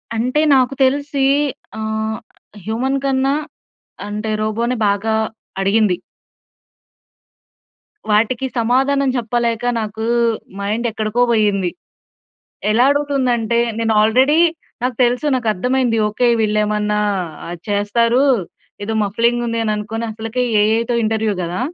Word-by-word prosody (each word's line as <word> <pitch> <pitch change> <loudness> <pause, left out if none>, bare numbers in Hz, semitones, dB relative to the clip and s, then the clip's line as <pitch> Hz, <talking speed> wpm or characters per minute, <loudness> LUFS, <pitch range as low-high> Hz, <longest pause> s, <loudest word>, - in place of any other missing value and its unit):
అంటే 250 +7 +1
నాకు 260 +1 +2
తెలిసీ 280 +1 +1 0.5
ఆహ్, 220 0 -2 0.5
హ్యూమన్ 260 +5 -1
కన్నా 270 +1 +1 0.7
అంటే 210 +1 -3
రోబో‌నే 230 +3 -1
బాగా 205 +2 0 0.5
అడిగింది. 200 -2 +2 2.1
వాటికి 230 +5 +2
సమాధానం 265 +4 +2
చెప్పలేక 235 0 -1 0.2
నాకూ 220 +1 -4 0.5
మైండ్ 215 +4 -2
ఎక్కడికో‌పోయింది. 215 -4 +1 1.0
ఎలా 235 +4 +4
అడుగుతుంది 285 -3 +1
అంటే 235 +1 0 0.2
నేను 225 -1 +1
ఆల్రెడీ 260 +8 +4 0.4
నాకు 250 -2 -1
తెలుసు 245 +5 0
నాకు 245 -3 -1
అర్థమైంది. 250 +3 0
ఓకె. 230 +4 0
వీళ్ళు 215 -1 +1
ఏమన్నా 210 0 0 0.5
ఆహ్, 175 +1 -5
చేస్తారు. 230 +5 +2 0.6
ఏదో 220 +2 -3
మఫ్లింగ్ 235 +4 +1
ఉంది 230 0 -2
అని 215 -1 0
అనుకోని 225 +2 -4
అసలకే 225 +3 -3 0.2
ఏ‌ఐ‌తో 225 +3 +1
ఇంటర్‌వ్యూ 220 -1 0
గదా. 175 +5 -3
225 Hz, 110 wpm, -18 LUFS, 215-250 Hz, 2.1 s, ఎలా